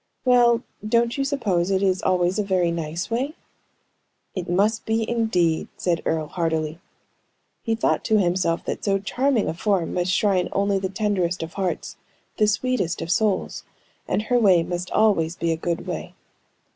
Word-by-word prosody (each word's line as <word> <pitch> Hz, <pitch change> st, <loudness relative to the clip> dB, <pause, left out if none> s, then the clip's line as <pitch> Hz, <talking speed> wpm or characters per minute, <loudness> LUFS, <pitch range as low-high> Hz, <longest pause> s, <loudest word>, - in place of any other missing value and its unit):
"Well. 240 Hz, -1 st, +4 dB, 0.2 s
Don't 235 Hz, +2 st, +1 dB
you 275 Hz, -, 0 dB
suppose 210 Hz, -11 st, 0 dB
it 195 Hz, 0 st, +1 dB
is 190 Hz, -1 st, +2 dB
always 180 Hz, +2 st, +1 dB
a -, -, +2 dB
very 185 Hz, -3 st, +1 dB
nice 165 Hz, +4 st, -4 dB
way?" 265 Hz, +7 st, -1 dB, 1.0 s
"It 180 Hz, -3 st, -5 dB
must 205 Hz, +5 st, +1 dB
be, 220 Hz, 0 st, 0 dB
indeed," 180 Hz, -9 st, +1 dB
said 170 Hz, -2 st, 0 dB
Earle, 160 Hz, -1 st, 0 dB
heartily. 160 Hz, -1 st, -2 dB, 0.8 s
He 225 Hz, -2 st, -1 dB
thought 225 Hz, -, 0 dB
to 220 Hz, -, +3 dB
himself 175 Hz, -3 st, +1 dB
that -, -, -4 dB
so 195 Hz, -1 st, +2 dB
charming 245 Hz, +4 st, 0 dB
a -, -, -1 dB
form 185 Hz, 0 st, 0 dB
must 180 Hz, 0 st, 0 dB
shrine 185 Hz, -2 st, +2 dB
only 200 Hz, 0 st, +1 dB
the 190 Hz, 0 st, -2 dB
tenderest 190 Hz, -3 st, -1 dB
of 165 Hz, -, -7 dB
hearts, 190 Hz, -2 st, -3 dB, 0.4 s
the 215 Hz, -, +3 dB
sweetest 215 Hz, -5 st, 0 dB
of 165 Hz, -, -3 dB
souls, 215 Hz, -2 st, 0 dB, 0.4 s
and 210 Hz, -, 0 dB
her 245 Hz, +2 st, +2 dB
way 185 Hz, -7 st, +5 dB
must 175 Hz, +1 st, -4 dB
always 180 Hz, -7 st, +2 dB
be 170 Hz, -1 st, -1 dB
a -, -, +1 dB
good 170 Hz, +1 st, -3 dB
way. -, -, -5 dB
190 Hz, 170 wpm, -23 LUFS, 175-220 Hz, 1.0 s, way